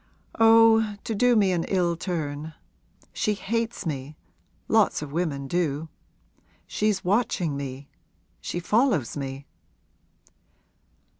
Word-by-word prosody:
'Oh, 225 -1 +6
to 225 - -3
do 245 +3 +3
me 200 -4 +3
an 170 -2 0
ill 175 -3 +1
turn. 155 -3 -4 0.6
She 210 - 0
hates 230 +2 -3
me 145 -1 -5 0.5
lots - - +2
of 145 - -8
women 145 -4 -2
do. 160 -1 -1 0.8
She's 210 -3 -1
watching 185 -6 +1
me 140 0 -6 0.5
she 175 - -4
follows 210 - +1
me.' 135 -1 -5
175 Hz, 105 wpm, -25 LUFS, 145-215 Hz, 0.8 s, Oh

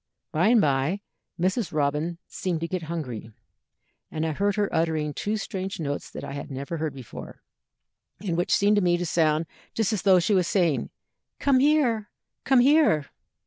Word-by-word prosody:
"By 170 +6 +2
and 235 +1 +6
by 145 +4 +1 0.4
Mrs. 185 +2 0
Robin 150 +3 0
seemed 175 -4 -3
to 165 - -1
get 185 0 -3
hungry, 125 -10 -5 0.8
and 160 0 -2
I 160 - 0
heard 200 +5 0
her 205 -1 +1
uttering 160 -2 0
two 210 +7 -2
strange 190 -3 -4
notes 145 -3 -3
that - - -8
I - - -6
had 140 - -6
never 140 +4 -5
heard 155 -2 -3
before, 130 -4 -10 0.8
and 185 -5 -2
which 175 +1 -1
seemed 205 +1 +4
to - - +4
me 175 -1 +3
to 175 - -2
sound 160 -1 +2 0.3
just 225 -1 +1
as 210 - -1
though 190 -2 +5
she 180 +4 +2
was 185 -3 +3
saying, 170 -7 +1 0.5
'Come 275 -2 +3
here! 260 -7 +2 0.4
come 265 -2 +5
here!' 275 - +4
175 Hz, 180 wpm, -26 LUFS, 155-205 Hz, 0.8 s, and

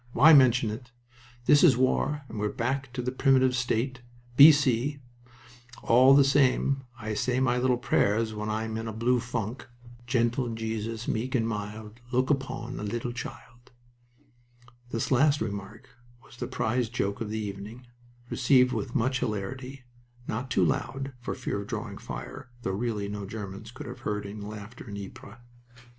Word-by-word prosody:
Why 155 +6 +7
mention 130 -5 +5
it? 120 +3 -8 0.6
This 145 +2 +6
is 140 -9 +6
war, 140 +3 +1
and 110 - -7
we're 105 0 0
back 130 +3 -2
to 125 -1 -3
the 125 - -1
primitive 130 -1 +3
state 125 +1 -1 0.3
B.C. 140 -2 +6 0.9
All 130 +3 +6
the 140 - +7
same, 135 0 +2
I 110 -2 -4
say 125 +4 0
my 125 -1 +2
little 125 0 +2
prayers 110 -2 +1
when 105 0 -4
I'm 110 +1 -2
in 115 0 -4
a 110 - -4
blue 120 +3 +2
funk. 120 0 -4 0.4
"Gentle 120 -1 0
Jesus, 110 0 -4
meek 125 +4 -1
and 115 -2 +1
mild, 105 +1 -6
Look 130 +2 +2
upon 130 -3 -3
a - - -5
little 120 +3 -3
child." 120 0 -9 1.2
This 115 +2 -2
last 145 +3 +4
remark 100 0 -5 0.4
was - - -17
the - - -4
prize 120 +1 -1
joke 100 -4 -2
of 110 - -3
the 110 - -3
evening, 105 +3 -6 0.5
received 125 0 +4
with 125 - -4
much 130 +2 +1
hilarity, 125 +4 -4 0.4
not 125 +4 -3
too 95 - +3
loud, 135 - -2
for 120 - -4
fear 100 - -3
of 100 - -9
drawing - - -5
fire - - -8
though 95 - -1
really 105 0 -2
no 100 -1 -5
Germans 105 0 -7
could 120 - -9
have - - -8
heard 105 -1 -3
any 105 +1 -7
laughter 105 +3 -9
in 100 - -6
Ypres. 100 +2 -10
120 Hz, 165 wpm, -28 LUFS, 110-130 Hz, 1.2 s, Why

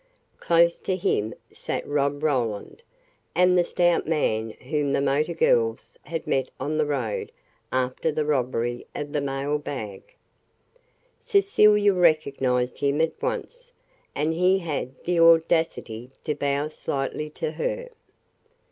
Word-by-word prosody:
Close 170 0 +3
to 185 - -1
him 110 - 0 0.2
sat - - -4
Rob 145 0 0
Roland, 125 - -1 0.5
and 180 0 +4
the 175 - +4
stout 175 -1 +1
man 115 -9 0
whom 145 +1 -1
the - - +2
motor 145 +5 +1
girls 115 -5 +1
had 165 +1 -5
met 130 -1 0
on 155 +2 -2
the 150 - +2
road 125 -8 -2 0.4
after 130 +4 0
the 150 0 -1
robbery 120 -4 -1
of 145 0 -4
the 145 - 0
mailbag. 135 -6 -3 1.2
Cecilia 210 - +4
recognized 140 -8 +1
him 140 +1 +1
at 160 0 +2
once, - - -4 0.4
and 155 +3 0
he 180 +3 +3
had 155 -8 -3
the 175 -1 +1
audacity 165 -8 +3
to 150 - -1
bow 140 +1 -1
slightly 150 0 -3
to 155 +1 -4
her. - - -3
150 Hz, 130 wpm, -25 LUFS, 130-170 Hz, 1.2 s, and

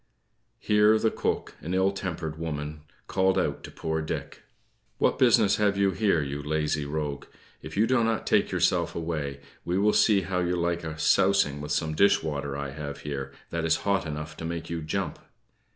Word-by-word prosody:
Here 105 +1 +4
the 110 0 +1
cook, - - -2
an 90 +3 -3
ill 95 +1 +3
tempered 85 -5 -4
woman, 75 -2 -4 0.2
called 95 0 +2
out - - -1
to - - -9
poor 80 0 -3
Dick: 80 - -5 0.6
"What - - +1
business 115 -5 +5
have 105 -2 +2
you 100 -1 +3
there, 95 -5 +2
you 70 +1 -4
lazy 75 0 -1
rogue? 75 -1 -3 0.4
If - - -8
you 110 - +5
do 120 0 +2
not 115 -1 0
take - - +3
yourself - - +1
away, 75 -4 -3 0.2
we 90 +1 -1
will 105 +2 +3
see 105 -3 +4
how 95 -1 -2
you 90 0 0
like 85 0 -1
a 80 -1 -5
sousing 75 -2 +3
of 75 - -6
some 80 +1 0
dish 100 +3 +4
water 70 -3 -3
I 70 -1 -4
have 70 0 -6
here, 70 -2 -4 0.2
that 85 -1 -2
is 80 - +3
hot 100 -4 +1
enough 75 +1 -5
to - - -7
make 85 0 -4
you 85 -1 -2
jump." 85 +4 -3
80 Hz, 190 wpm, -27 LUFS, 75-95 Hz, 0.6 s, business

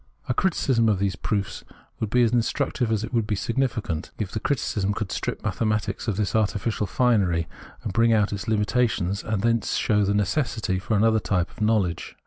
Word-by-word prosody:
A - - +1
criticism 130 -8 +2
of 105 - +2
these 100 0 0
proofs 100 -2 -3 0.4
would 110 - -2
be 125 +3 +4
as 115 - +3
instructive 120 0 0
as 110 -1 0
it 115 - -6
would 115 -3 +1
be 105 - 0
significant, 115 -8 -2
if 105 -4 -3
the 110 - -2
criticism 105 -6 -1
could 110 -3 -3
strip - - -3
mathematics 110 -1 -1
of 105 -4 -1
this 105 0 -1
artificial 105 0 0
finery, 95 -8 +2 0.4
and - - -3
bring 115 +3 +4
out 105 -2 +2
its 100 - -4
hmitations, 105 -3 0
and 110 -2 -2
thence 115 -1 +1
show 105 -1 +2
the 100 +1 +1
necessity 105 -2 0
for 110 +2 0
another 110 +1 +4
type 90 -4 -1
of - - -14
knowledge. 105 -5 0
110 Hz, 190 wpm, -25 LUFS, 100-115 Hz, 0.4 s, be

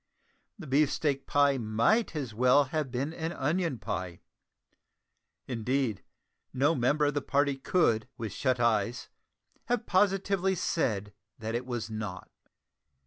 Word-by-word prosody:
The 180 - -9
beefsteak 145 0 +1
pie 145 -2 +3
might 115 - +1
as 135 -7 -4
well 125 +5 +5
have 155 -4 -1
been 135 +5 -3
an 165 0 -3
onion 160 0 -1
pie; 90 -5 -5 1.2
indeed, 125 -2 -1 0.5
no 140 +5 +2
member 145 +3 +2
of 145 - +1
the 145 - -1
party 140 +1 +1
could, 135 -6 +1
with 110 -4 -4
shut 130 -3 0
eyes, 115 0 +1 0.6
have 245 -1 -1
positively 195 0 +2
said 105 - -1 0.2
that 110 0 -4
it 120 +2 -3
was 115 -3 -4
not. 105 -4 -6
135 Hz, 130 wpm, -29 LUFS, 115-155 Hz, 1.2 s, well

